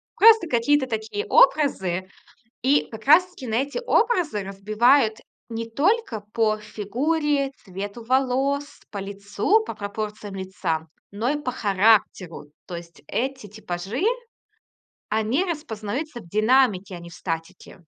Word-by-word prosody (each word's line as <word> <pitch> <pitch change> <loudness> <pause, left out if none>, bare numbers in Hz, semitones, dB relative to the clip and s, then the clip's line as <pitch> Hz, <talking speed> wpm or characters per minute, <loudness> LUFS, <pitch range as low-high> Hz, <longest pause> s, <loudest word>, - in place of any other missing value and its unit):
просто 445 -4 +7
какие-то 260 +1 +2
такие 220 - -3
образы. 190 - +3 0.5
И 275 +4 +3
как 220 - -9
раз 345 +5 +7
таки 300 -8 -10
на 225 -1 -1
эти 280 - -1
образы 345 - +2
разбивают 215 +5 +2 0.3
не 230 0 -5
только 300 - +1
по 215 -2 +2
фигуре, 275 +7 -1
цвету 200 +3 -6
волос, 270 +3 0
по 205 - -6
лицу, 200 - 0
по - - -6
пропорциям 210 0 -5
лица, 190 -4 -3 0.2
но 215 +4 -2
и 295 0 -1
по 250 - -2
характеру. 200 -6 +2 0.2
То 175 - -6
есть, 170 0 -12
эти 260 -2 -3
типажи, 200 - -5 1.1
они 220 - +1
распознаются 280 - -4
в 195 - -14
динамике, 215 -2 +2
а - - -8
не 170 0 -11
в - - -13
статике. 165 -1 -6
220 Hz, 130 wpm, -24 LUFS, 200-280 Hz, 1.1 s, просто